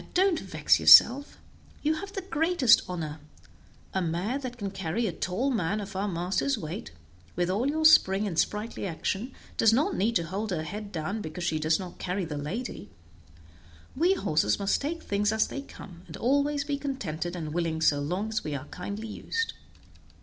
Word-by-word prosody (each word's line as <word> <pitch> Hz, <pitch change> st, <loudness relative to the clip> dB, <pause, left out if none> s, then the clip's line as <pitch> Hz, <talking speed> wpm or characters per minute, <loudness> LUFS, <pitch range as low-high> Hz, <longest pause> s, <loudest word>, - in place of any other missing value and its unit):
don't 370 Hz, -2 st, +3 dB
vex -, -, +2 dB
yourself; 280 Hz, +5 st, +7 dB, 0.5 s
you 305 Hz, +1 st, +2 dB
have 395 Hz, +5 st, -6 dB
the 390 Hz, -, -4 dB
greatest 325 Hz, -, +4 dB
honor; 160 Hz, -4 st, -4 dB, 0.7 s
a 190 Hz, -, 0 dB
mare 180 Hz, +10 st, -1 dB
that 255 Hz, -3 st, -6 dB
can 200 Hz, -4 st, -4 dB
carry 190 Hz, +5 st, -2 dB
a 200 Hz, -, 0 dB
tall 195 Hz, +12 st, -1 dB
man 205 Hz, -3 st, 0 dB
of 200 Hz, -2 st, -7 dB
our 195 Hz, +2 st, -1 dB
master's 190 Hz, +9 st, -1 dB
weight, 155 Hz, -, -6 dB, 0.4 s
with 175 Hz, +1 st, 0 dB
all 230 Hz, +8 st, 0 dB
your 315 Hz, +2 st, 0 dB
spring 205 Hz, -10 st, +6 dB
and 170 Hz, -5 st, -1 dB
sprightly 210 Hz, -1 st, -1 dB
action, 195 Hz, +8 st, -3 dB, 0.3 s
does 225 Hz, -, +5 dB
not 295 Hz, -, +2 dB
need 225 Hz, +4 st, 0 dB
to 170 Hz, -, +2 dB
hold 195 Hz, +6 st, -4 dB
her 170 Hz, -4 st, -2 dB
head 205 Hz, +4 st, -6 dB
down 180 Hz, +5 st, -3 dB
because 175 Hz, 0 st, -6 dB
she 160 Hz, -2 st, 0 dB
does 155 Hz, +1 st, +2 dB
not 185 Hz, -2 st, -8 dB
carry 185 Hz, +1 st, -2 dB
the 150 Hz, -2 st, -5 dB
lady; 170 Hz, -, -5 dB, 1.1 s
we 350 Hz, +7 st, +3 dB
horses 150 Hz, -, +1 dB
must 200 Hz, 0 st, 0 dB
take 325 Hz, +4 st, -3 dB
things 205 Hz, +1 st, 0 dB
as 220 Hz, 0 st, +2 dB
they 275 Hz, -, -5 dB
come, 185 Hz, -10 st, -12 dB
and 160 Hz, -, -9 dB
always 285 Hz, +3 st, +1 dB
be 290 Hz, -2 st, -3 dB
contented 185 Hz, -, -4 dB
and 155 Hz, -3 st, -5 dB
willing 165 Hz, -2 st, -1 dB
so 145 Hz, -2 st, +3 dB
long 180 Hz, +9 st, -2 dB
as 215 Hz, -1 st, -2 dB
we 150 Hz, -1 st, -3 dB
are 140 Hz, 0 st, -5 dB
kindly 200 Hz, +5 st, -6 dB
used." 455 Hz, -, -3 dB
200 Hz, 185 wpm, -28 LUFS, 170-265 Hz, 1.1 s, yourself